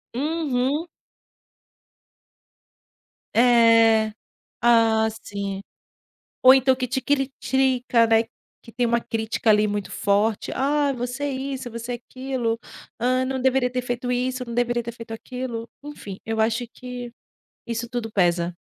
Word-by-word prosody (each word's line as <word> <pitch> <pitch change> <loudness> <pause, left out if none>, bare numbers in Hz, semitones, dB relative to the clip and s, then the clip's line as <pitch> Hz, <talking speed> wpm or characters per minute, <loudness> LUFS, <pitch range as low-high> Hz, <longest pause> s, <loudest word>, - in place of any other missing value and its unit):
Uhum. 290 0 0 2.5
É. 230 -2 +5 0.5
Ah, 225 -2 +4 0.2
sim. 200 -1 -5 0.8
Ou 255 - +9
então 265 0 +4
que 255 -1 -3
te 265 - -1
critica, 265 -3 +1
né, 225 0 +4 0.4
que 230 - -15
tem 245 - 0
uma 235 0 +2
crítica, 225 +1 -3
ali, 210 0 +4
muito 205 -1 -3
forte: 205 +2 +1
"Ah, 285 +1 +1
você 250 +2 -4
é 285 - -1
isso, 265 -1 -4
você 235 +2 -5
é - - -2
aquilo, 245 -1 -3 0.4
hã, 255 +2 +2
não 260 0 -2
deveria 260 -1 +2
ter 250 0 -2
feito 245 0 -3
isso, 250 +1 -1
não 235 -1 -7
deveria 240 0 +1
ter 235 - -5
feito 230 -1 -10
aquilo", 240 -1 -6 0.2
enfim, 205 -10 -8
eu 225 0 -1
acho 225 +2 +1
que 250 -1 -7 0.5
isso 235 0 -4
tudo 240 -2 -4
pesa. 175 -3 +1
245 Hz, 135 wpm, -23 LUFS, 225-260 Hz, 2.5 s, Ou